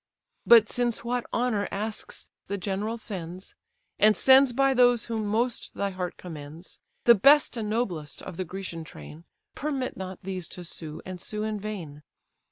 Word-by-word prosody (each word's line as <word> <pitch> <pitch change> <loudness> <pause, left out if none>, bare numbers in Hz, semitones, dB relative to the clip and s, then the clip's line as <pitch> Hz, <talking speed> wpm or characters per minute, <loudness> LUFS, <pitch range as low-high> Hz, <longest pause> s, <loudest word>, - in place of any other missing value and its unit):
But 230 -2 +8
since 240 -1 -1
what 245 0 -2
honour 235 -4 0
asks 215 +2 -5 0.2
the 200 - -2
general 200 +4 -2
sends, 185 -4 -7 0.5
And 215 +1 +5
sends 265 0 +6
by 270 +2 +3
those 245 -2 +4
whom 220 -2 -2
most 235 +3 -1
thy 200 0 -1
heart 180 -1 -4
commends; 160 0 -9 0.2
The 235 - +8
best 275 +6 +5
and 220 -3 -3
noblest 185 -10 -3
of - - -7
the 185 - -2
Grecian 180 -2 -6
train; 150 - -11 0.3
Permit 275 -3 -3
not 185 -1 -6
these 185 -2 -4
to 180 - -7
sue, 160 -2 -7
and 185 -1 -7
sue 210 0 -4
in 215 -1 -2
vain! 180 -9 -6
205 Hz, 165 wpm, -27 LUFS, 180-235 Hz, 0.5 s, But